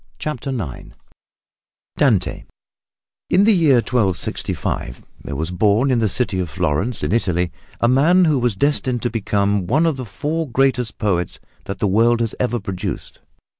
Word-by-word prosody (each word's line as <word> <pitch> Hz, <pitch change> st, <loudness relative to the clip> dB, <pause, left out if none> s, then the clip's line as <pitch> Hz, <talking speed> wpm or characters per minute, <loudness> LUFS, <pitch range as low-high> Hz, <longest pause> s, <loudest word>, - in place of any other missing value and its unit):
CHAPTER 140 Hz, -3 st, -4 dB
IX 105 Hz, -, -5 dB, 1.0 s
DANTE -, -, +1 dB, 0.8 s
In 185 Hz, +3 st, +4 dB
the 220 Hz, +1 st, +5 dB
year 160 Hz, -7 st, +4 dB
1265 100 Hz, -, -1 dB, 0.2 s
there 70 Hz, -, -5 dB
was 80 Hz, +5 st, -3 dB
born 105 Hz, +8 st, +2 dB
in 125 Hz, -, +2 dB
the 110 Hz, -2 st, +1 dB
city 100 Hz, -3 st, -1 dB
of 90 Hz, -3 st, -2 dB
Florence 90 Hz, +7 st, -1 dB
in -, -, -1 dB
Italy 90 Hz, -6 st, 0 dB, 0.3 s
a 120 Hz, -, +3 dB
man 160 Hz, +9 st, +4 dB
who 150 Hz, -4 st, +2 dB
was 120 Hz, -4 st, +1 dB
destined 130 Hz, -1 st, 0 dB
to 120 Hz, -, 0 dB
become 100 Hz, -3 st, 0 dB
one 155 Hz, -, +2 dB
of 160 Hz, -4 st, +1 dB
the 130 Hz, -, -5 dB
four 150 Hz, +10 st, -3 dB
greatest 125 Hz, -2 st, +1 dB
poets 90 Hz, -6 st, -1 dB, 0.3 s
that 95 Hz, -, -5 dB
the 105 Hz, -, -1 dB
world 115 Hz, +4 st, +3 dB
has 115 Hz, -2 st, -1 dB
ever 120 Hz, -1 st, 0 dB
produced. 95 Hz, -3 st, -5 dB
115 Hz, 160 wpm, -20 LUFS, 95-130 Hz, 1.0 s, the